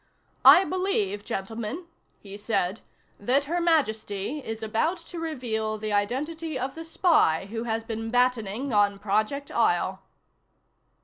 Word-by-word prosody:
"I 375 - +9
believe, 360 - -1
gentlemen," 225 - -5 0.4
he 200 -1 -10
said, 205 -2 -1 0.4
"that 255 +7 +2
Her 340 +5 -2
Majesty 225 - 0
is 225 0 -6
about 225 +12 0
to 340 0 -9
reveal 230 -9 -2
the 215 0 -3
identity 290 +9 -1
of 260 +1 -3
the 325 - -7
spy 320 - +3
who 230 +1 -4
has 225 -1 -1
been 225 0 -4
battening 245 0 0
on 205 -1 +3
Project 215 +8 -1
Isle." - - +1
225 Hz, 130 wpm, -26 LUFS, 210-300 Hz, 0.4 s, I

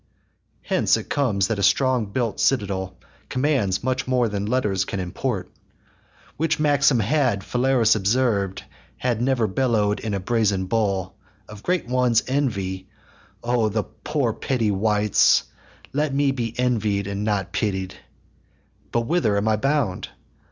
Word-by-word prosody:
Hence - - +2
comes 110 -10 0
it - - -4
that 110 -3 -1
a - - -1
strong 125 +4 +2
built 115 +1 -2
citadel 95 -7 0 0.3
Commands 130 -9 0
much 130 0 -1
more 125 -2 +2
than 100 0 -3
letters 105 -6 +1
can 100 - -4
import: 95 +1 -3 0.9
Which 160 +1 0
maxim 145 -4 +3
had 120 -3 +1
Phalaris 125 -2 +2
observ'd, 100 -2 0 0.4
H'ad 120 -3 +1
never 125 -2 +1
bellow'd, 105 -1 +1
in 110 -3 -3
a - - -1
brazen 100 -2 0
bull, 95 -3 -1 0.3
Of 105 -1 -11
great 180 -2 -1
ones' 125 -2 +2
envy: 100 -9 -2 0.6
o' 120 -2 +1
the 105 0 -1
poor 140 -7 -2
petty 115 -4 -1
wights 105 +1 +3 0.5
Let 145 0 0
me 140 -1 +2
be 115 -4 -4
envied 110 -5 0
and 100 +1 -3
not 100 -3 -1
pitied. 95 -3 -2 1.0
But 120 - +1
whither 115 -6 +1
am 100 +2 0
I 110 - +3
bound? 135 -6 -1
110 Hz, 140 wpm, -23 LUFS, 100-130 Hz, 1.0 s, maxim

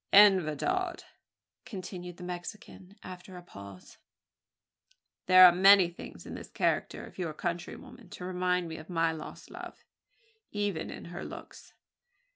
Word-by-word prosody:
"En 200 -2 +8
verdad," 350 - -2 0.6
continued 180 -3 -7
the 180 - -9
Mexican, 180 +2 -8
after 185 0 -9
a 180 - -10
pause, 100 - -12 1.3
"there 185 0 +10
are 180 - +10
many 190 0 +7
things 170 - -10
in - - -7
the - - -7
character - - -1
of - - -14
your 165 -4 -3
countrywoman 200 +10 -6
to 180 - -8
remind 180 -1 0
me 160 0 -6
of 160 - -11
my 165 -2 +2
lost 160 -1 -9
love - - -10 0.7
even 205 -6 -2
in - - -8
her 175 - -5
looks. - - -10
180 Hz, 140 wpm, -30 LUFS, 170-195 Hz, 1.3 s, there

